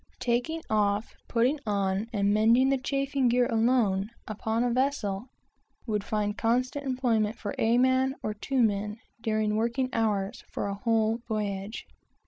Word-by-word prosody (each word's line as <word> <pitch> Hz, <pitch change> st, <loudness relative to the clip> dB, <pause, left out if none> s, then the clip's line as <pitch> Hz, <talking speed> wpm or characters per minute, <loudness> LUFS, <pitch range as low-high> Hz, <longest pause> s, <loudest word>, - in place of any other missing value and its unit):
Taking 250 Hz, +7 st, -1 dB
off, 210 Hz, 0 st, +1 dB
putting 250 Hz, +6 st, +2 dB
on, 200 Hz, 0 st, 0 dB
and 200 Hz, -2 st, +1 dB
mending 230 Hz, +5 st, +4 dB
the 270 Hz, -1 st, +2 dB
chafing 275 Hz, -1 st, 0 dB
gear 245 Hz, +1 st, +3 dB
alone, 225 Hz, -4 st, +2 dB, 0.2 s
upon 220 Hz, +2 st, -1 dB
a 245 Hz, -1 st, +1 dB
vessel, 245 Hz, -5 st, -1 dB, 0.6 s
would 210 Hz, -4 st, -1 dB
find 205 Hz, -1 st, -1 dB
constant 255 Hz, +5 st, 0 dB
employment 235 Hz, -4 st, +1 dB
for 205 Hz, -, -4 dB
two -, -, -2 dB, 0.6 s
or 215 Hz, -, -1 dB
three 265 Hz, +6 st, -3 dB
men, 210 Hz, 0 st, 0 dB, 0.2 s
during 215 Hz, -2 st, 0 dB
working 235 Hz, +4 st, 0 dB
hours, 215 Hz, 0 st, -1 dB
for -, -, -3 dB
a 200 Hz, -, -2 dB
whole 225 Hz, +2 st, +1 dB
voyage. 205 Hz, -1 st, -3 dB
225 Hz, 140 wpm, -28 LUFS, 210-250 Hz, 0.6 s, mending